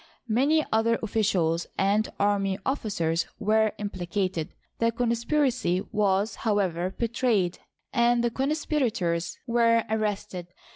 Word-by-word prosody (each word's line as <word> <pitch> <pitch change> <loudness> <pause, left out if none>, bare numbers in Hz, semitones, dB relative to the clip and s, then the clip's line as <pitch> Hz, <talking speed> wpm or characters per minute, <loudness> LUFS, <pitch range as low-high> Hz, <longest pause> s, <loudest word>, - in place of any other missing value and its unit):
Many 300 +6 +3
other 230 +1 +3
officials 185 -6 +1
and 205 +3 +2
army 200 -1 +1
officers 170 - -1
were 220 +1 +2
im 205 -1 -4
plicated. 180 -2 -2 0.3
The 230 0 +2
conspiracy 235 - +1
was, 205 0 +1
however, 190 -4 0
betrayed 230 -6 0 0.3
and 240 -1 +3
the 240 - +1
conspirators 235 - -1
were 230 -2 +3
arrested. 205 -4 -2
215 Hz, 105 wpm, -26 LUFS, 190-235 Hz, 0.3 s, Many